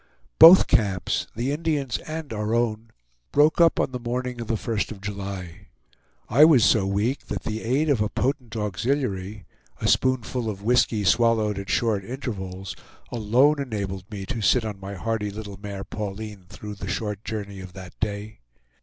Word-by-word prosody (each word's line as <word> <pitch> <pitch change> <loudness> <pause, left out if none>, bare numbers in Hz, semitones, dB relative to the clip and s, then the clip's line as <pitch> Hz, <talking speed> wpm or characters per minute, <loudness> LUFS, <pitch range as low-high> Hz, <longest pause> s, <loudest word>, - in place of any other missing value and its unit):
Both 175 +3 +10
camps, 100 -8 +1
the 120 +5 -1
Indians' 145 -4 -1
and 155 -5 -6
our 105 +1 -1
own, 115 -1 0 0.4
broke 150 +3 +4
up 165 -1 +5
on - - +1
the 125 - -4
morning 125 0 -3
of 115 - -6
the 115 - 0
1st 110 -1 -2
of 105 - -8
July. 100 -4 -6 0.6
I 135 +7 +5
was 150 -8 +7
so 100 -4 +3
weak 105 +8 -1
that - - -4
the 110 +1 -3
aid 135 +7 +1
of 140 -7 +2
a 105 - +1
potent 125 -3 -2
auxiliary, 105 -2 -2 0.3
a - - -1
spoonful 125 -2 +1
of 100 -1 -6
whisky 115 -2 +2
swallowed 110 0 +2
at 100 - -7
short 110 -4 +1
intervals, 95 -6 -6 0.4
alone 125 +7 +3
enabled 100 -6 -4
me 100 -3 -6
to 120 -1 -4
sit 115 +3 +3
on 105 -3 -5
my 100 +1 -7
hardy 105 +2 -2
little 100 -1 -8
mare 100 -2 -6
Pauline 105 -2 -6
through 105 +3 -8
the 95 -2 -7
short 105 +1 -3
journey 100 -3 -5
of 95 -1 -10
that 90 -1 -10
day. 105 0 -4
110 Hz, 170 wpm, -24 LUFS, 100-125 Hz, 0.6 s, Both